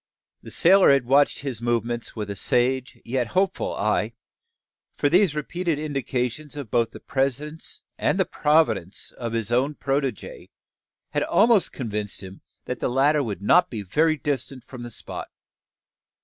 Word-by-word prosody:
The - - -11
sailor 190 +2 +6
had 140 -3 +4
watched 140 +3 +3
his 130 -5 -4
movements 120 0 -1
with 105 -2 -4
a - - -5
sage 125 +5 0
yet 125 0 -1
hopeful 195 0 +1
eye: - - 0 0.8
for 145 - +1
these 180 -1 +4
repeated 165 +2 -2
indications 140 -1 -3
of 140 -7 -7
both 115 -2 +2
the - - -11
presence 140 +4 -2 0.2
and 190 - +1
providence 130 - +1
of 115 -2 -5
his 115 -1 -2
own 135 +5 +1
protege 135 -5 -3 0.6
had - - 0
almost 220 -2 +3
convinced 105 -5 -4
him 95 0 -10 0.2
that 125 - -4
the - - 0
latter 140 +4 +3
would 105 -6 -4
not 180 - +5
be 110 -4 -5
very 155 - +2
distant 135 -2 -3
from 125 -1 -10
the 120 - -6
spot. - - -7
130 Hz, 150 wpm, -24 LUFS, 115-150 Hz, 0.8 s, sailor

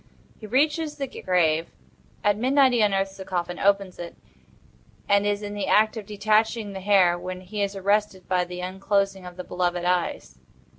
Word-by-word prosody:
He 215 - -9
reaches 300 +6 +1
the 280 - -2
grave. 170 -8 0 0.5
At 205 0 +3
midnight 260 +4 +3
he 240 -2 +2
unearths 195 -2 +1
the 190 - -7
coffin, 175 -1 -3
opens 200 -2 +1
it, 170 -1 -7 0.9
and 200 0 +3
is 205 0 -1
in 205 0 -5
the 205 -1 -3
act 215 +2 +3
of 215 -3 -7
detaching 215 +1 +1
the 190 - -5
hair, 185 -3 +4
when 185 +1 -6
he 205 +3 -5
is 200 0 -1
arrested 200 -1 0
by 180 -1 +1
the 180 0 -7
unclosing 195 0 -1
of 180 0 -11
the 180 - -5
beloved 175 -1 -2
eyes. 170 - -1
195 Hz, 180 wpm, -25 LUFS, 180-210 Hz, 0.9 s, hair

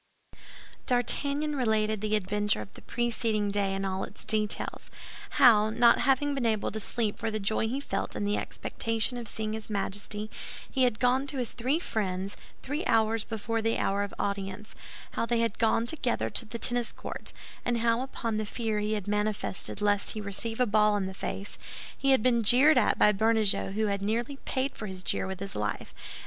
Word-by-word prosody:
D'Artagnan 285 +4 +1
related 220 -4 +1
the 215 0 +1
adventure 210 - +1
of 100 - -16
the - - -13
preceding 225 -3 -1
day 200 -1 0
in 195 0 -2
all 190 0 -2
its - - -8
details; 215 -1 -1 0.5
how, 225 -6 +7
not 235 +1 +5
having 285 +1 +2
been 270 -3 -2
able 215 -2 0
to 220 - -3
sleep 220 0 0
for 225 - -1
the 215 0 -2
joy 215 +2 0
he 255 +5 -2
felt 195 -8 -3
in 205 - -2
the 205 0 +1
expectation 225 +2 -1
of 235 - -7
seeing 215 0 -3
his 220 0 -6
Majesty, 205 +1 -3 0.4
he 260 -2 +2
had 240 -3 +1
gone 255 +3 +2
to 275 - -3
his 245 -3 -1
three 255 +6 0
friends 195 - -2 0.3
three 290 +5 -3
hours 220 0 +2
before 225 0 -2
the 225 +1 +1
hour 200 +1 0
of 205 - -3
audience; 200 +1 -3 0.4
how 230 - -2
they 235 -1 +1
had 230 -2 -1
gone 225 0 +3
together 255 -2 0
to 235 - 0
the 235 +2 -5
tennis 240 +1 +2
court, - - -7 0.3
and 240 -1 0
how, 230 +1 +2
upon 230 -4 -3
the 215 - -1
fear 220 -1 -2
he 210 +1 -1
had 205 -3 -3
manifested 210 -1 -1
lest 205 -1 +3
he 215 - -5
receive 210 +3 -3
a 250 - +4
ball 210 -1 +3
in 195 - -1
the 190 - -5
face, 195 +1 -6 0.4
he 275 - 0
had 265 -5 +4
been 240 -2 +3
jeered 260 +8 +6
at - - +2
by 210 - +6
Bernajoux, 220 -2 +1
who 215 +2 0
had 200 -1 -1
nearly 235 +7 -1
paid 265 +2 -1
for 215 - -6
his 185 -1 -7
jeer - - 0
with 190 -1 -5
his 195 0 -5
life, 105 0 -3
and - - -26
M. - - -14
220 Hz, 205 wpm, -29 LUFS, 205-240 Hz, 0.5 s, how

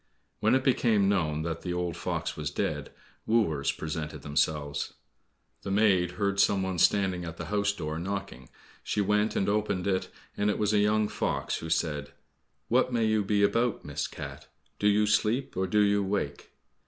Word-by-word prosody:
When - - +3
it 130 - +1
became 115 -6 +3
known 80 -6 +1
that 85 0 -3
the 90 - -3
old 90 -2 -2
fox - - -3
was 75 -2 -3
dead, 75 - -2 0.4
wooers 80 -12 +2
presented 75 -2 -5
themselves. 75 0 -1 0.7
The - - -6
maid 95 -3 +3
heard 100 0 -1
some 100 -1 +3
one 95 -2 -2
standing 95 -2 +3
at 85 -1 -7
the - - -5
house 100 -1 +2
door, 80 -5 -4
knocking. 95 -9 -5 0.3
She - - -2
went 105 +2 +2
and 95 - +1
opened 105 -3 0
it, 95 -2 0 0.3
and 105 +1 +1
it 105 - 0
was 105 0 +1
a 105 - +4
young 105 +1 +3
fox, - - -2
who 80 - -6
said, 75 -3 -1 0.5
"What 125 +2 +2
may 115 -2 +1
you 110 -1 +2
be 100 +1 +2
about, 115 +3 +1
Miss - - -3
Cat? - - -8 0.3
Do 105 - +2
you 105 +1 +4
sleep 110 +5 +1
or 95 0 0
do 105 +3 +3
you 100 0 +3
wake?" 95 -7 -3
100 Hz, 180 wpm, -28 LUFS, 80-105 Hz, 0.7 s, a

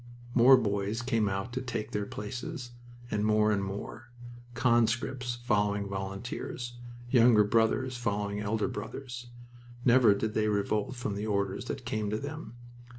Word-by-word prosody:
More 130 +2 +8
boys 105 0 -1
came 115 -4 +1
out 95 +5 -3
to 130 - -2
take 115 -3 -4
their 105 -3 -2
places, 120 +3 -6 0.4
and 105 -1 0
more, 110 0 +3
and 100 -2 +1
more, 105 +4 -6 0.5
conscripts 120 +1 +1
following 105 -3 +1
volunteers, 100 +5 -5 0.4
younger 115 -4 +6
brothers 115 +4 +1
following 105 -3 -2
elder 105 +2 0
brothers. 125 -1 -6 0.6
Never 120 -4 +6
did 110 +1 -2
they 110 -1 +1
revolt 105 +3 0
from 120 -4 -3
the 105 +2 -3
orders 100 0 -1
that 130 -1 -5
came 110 -3 -1
to 105 - -1
them. 145 -2 -7
110 Hz, 145 wpm, -30 LUFS, 105-120 Hz, 0.6 s, More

